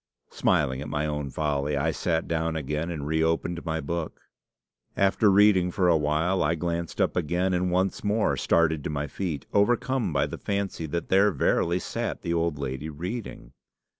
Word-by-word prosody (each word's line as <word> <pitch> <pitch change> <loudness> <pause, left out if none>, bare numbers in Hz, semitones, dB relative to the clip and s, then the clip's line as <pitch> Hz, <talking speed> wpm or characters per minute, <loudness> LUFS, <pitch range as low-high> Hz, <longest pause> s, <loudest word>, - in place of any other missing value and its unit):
Smiling 65 -3 +1
at 75 - -6
my 75 0 -1
own 75 -2 -3
folly, 75 0 -1
I 80 +4 +1
sat 80 0 -1
down 80 0 -1
again, 75 +2 -2
and 80 -5 -4
reopened 80 +2 0
my 80 -1 -2
book. 85 +2 -4 0.8
After 100 +2 +3
reading 100 -2 +5
for 90 0 +1
a 85 - +5
while, 80 +5 +1
I 80 +3 +2
glanced 85 0 -3
up - - +1
again, 90 +3 0
and 90 0 +1
once 95 +1 0
more 105 +1 +1
started 80 -3 +2
to - - -1
my 75 -1 -2
feet, 75 0 -4
overcome 120 +1 +2
by 70 -2 +1
the - - -7
fancy 100 -5 -3
that 85 +3 -4
there 100 +2 +5
verily 85 +3 +1
sat 90 - -4
the 85 - -1
old 85 -2 0
lady 70 +2 -4
reading. 85 - -6
85 Hz, 175 wpm, -26 LUFS, 75-90 Hz, 0.8 s, reading